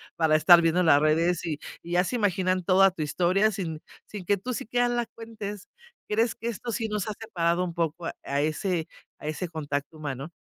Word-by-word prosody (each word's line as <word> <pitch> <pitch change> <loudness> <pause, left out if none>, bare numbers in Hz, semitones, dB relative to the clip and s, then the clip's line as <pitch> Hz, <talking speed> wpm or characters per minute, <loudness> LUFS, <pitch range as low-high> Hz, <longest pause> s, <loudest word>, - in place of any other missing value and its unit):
para 160 -2 +3
estar 170 +2 +7
viendo 165 +2 +2
las 145 -4 +6
redes 165 +3 +2
y 155 -3 -3 0.2
y 170 - -7
ya 180 +1 +4
se 220 - -3
imaginan 185 -3 +1
toda 190 +2 +5
tu 170 - -7
historia, 180 +8 +2
sin 170 -6 -4 0.2
sin 205 -4 -8
que 200 +2 +2
tú 250 +7 -4
sí 220 - -4
quiera 245 +1 +2
las 240 -1 -1
cuentes. 210 -3 -7 0.4
¿Crees 225 +2 +1
que 230 - -6
esto 235 +2 -5
sí 225 0 -2
nos 210 -2 -2
ha - - -2
separado 175 -5 0
un 175 -2 -4
poco 165 0 -2
a 140 -3 -3
ese 160 +2 -1 0.3
a - - -11
ese 155 +4 -3
contacto 145 -1 -4
humano? 145 0 -5
180 Hz, 205 wpm, -27 LUFS, 160-210 Hz, 0.4 s, estar